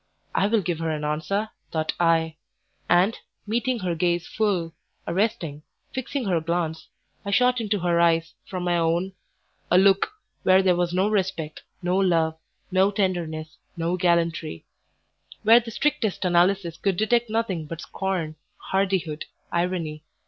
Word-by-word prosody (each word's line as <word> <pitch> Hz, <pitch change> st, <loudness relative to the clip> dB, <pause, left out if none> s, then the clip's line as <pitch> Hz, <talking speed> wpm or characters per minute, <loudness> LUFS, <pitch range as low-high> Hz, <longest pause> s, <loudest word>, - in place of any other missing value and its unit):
"I 195 Hz, -, +3 dB
will 215 Hz, -1 st, +2 dB
give 175 Hz, -2 st, -2 dB
her 165 Hz, -1 st, -1 dB
an 155 Hz, -1 st, -2 dB
answer," 180 Hz, +8 st, -1 dB, 0.2 s
thought 155 Hz, -1 st, -1 dB
I; 165 Hz, -2 st, +2 dB, 0.5 s
and, 185 Hz, +6 st, +4 dB, 0.3 s
meeting 235 Hz, +3 st, 0 dB
her 180 Hz, -2 st, -1 dB
gaze 175 Hz, +1 st, 0 dB
full, 185 Hz, -7 st, -1 dB, 0.3 s
arresting, 170 Hz, -6 st, -1 dB, 0.3 s
fixing 260 Hz, 0 st, -3 dB
her 175 Hz, -4 st, +1 dB
glance, 160 Hz, -1 st, -2 dB, 0.4 s
I 200 Hz, -, -4 dB
shot 250 Hz, +4 st, +3 dB
into 210 Hz, -1 st, 0 dB
her 170 Hz, -1 st, +2 dB
eyes, 165 Hz, -1 st, +3 dB
from 185 Hz, -2 st, -4 dB
my 175 Hz, -1 st, +1 dB
own, 170 Hz, +3 st, 0 dB, 0.6 s
a 180 Hz, -, +5 dB
look, 195 Hz, -, +4 dB, 0.3 s
where 190 Hz, +1 st, +5 dB
there 185 Hz, -2 st, +4 dB
was 175 Hz, 0 st, 0 dB
no 185 Hz, +3 st, +2 dB
respect, 190 Hz, -7 st, -1 dB, 0.2 s
no 180 Hz, +1 st, +1 dB
love, 165 Hz, -4 st, +2 dB, 0.4 s
no 190 Hz, +1 st, +4 dB
tenderness, 170 Hz, -6 st, -2 dB, 0.2 s
no 170 Hz, +2 st, 0 dB
gallantry; 170 Hz, -, 0 dB, 0.8 s
where 225 Hz, +2 st, +8 dB
the 235 Hz, -1 st, -8 dB
strictest 230 Hz, -6 st, 0 dB
analysis 175 Hz, -1 st, +2 dB
could 195 Hz, -2 st, 0 dB
detect 235 Hz, +3 st, +2 dB
nothing 205 Hz, -8 st, -1 dB
but 165 Hz, +1 st, -6 dB
scorn, 180 Hz, -5 st, -3 dB, 0.2 s
hardihood, 190 Hz, -5 st, -1 dB, 0.3 s
irony. 170 Hz, -3 st, -1 dB
180 Hz, 145 wpm, -25 LUFS, 165-200 Hz, 0.8 s, where